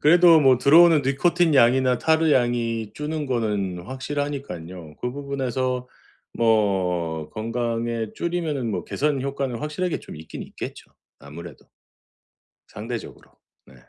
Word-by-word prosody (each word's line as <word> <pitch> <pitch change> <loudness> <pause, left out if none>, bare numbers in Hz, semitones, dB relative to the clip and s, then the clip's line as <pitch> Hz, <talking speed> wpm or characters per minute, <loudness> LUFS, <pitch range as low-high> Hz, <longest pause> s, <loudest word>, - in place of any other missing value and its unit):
그래도 170 +1 +6
뭐 130 -3 +5
들어오는 160 +3 +6
니코틴 160 +4 +2
양이나 125 0 +4
타르 160 0 +2
양이 115 -4 0
주는 150 0 -4
거는 105 -8 -2
확실하니깐요. 130 - -5
그 125 - -2
부분에서 130 -2 -3 0.5
뭐 90 -8 0
건강에 115 0 -2
줄이면은 160 -8 -2
뭐 90 -4 -3
개선 145 -2 -1
효과는 135 -3 -3
확실하게 150 +5 -3
좀 - - -11
있긴 80 +1 -8
있겠죠. - - -9 0.3
아무래도 80 +4 -11 1.0
상대적으로. 115 +2 -8 0.3
네. 65 - -18
125 Hz, 290 characters per minute, -23 LUFS, 110-145 Hz, 1.0 s, 그래도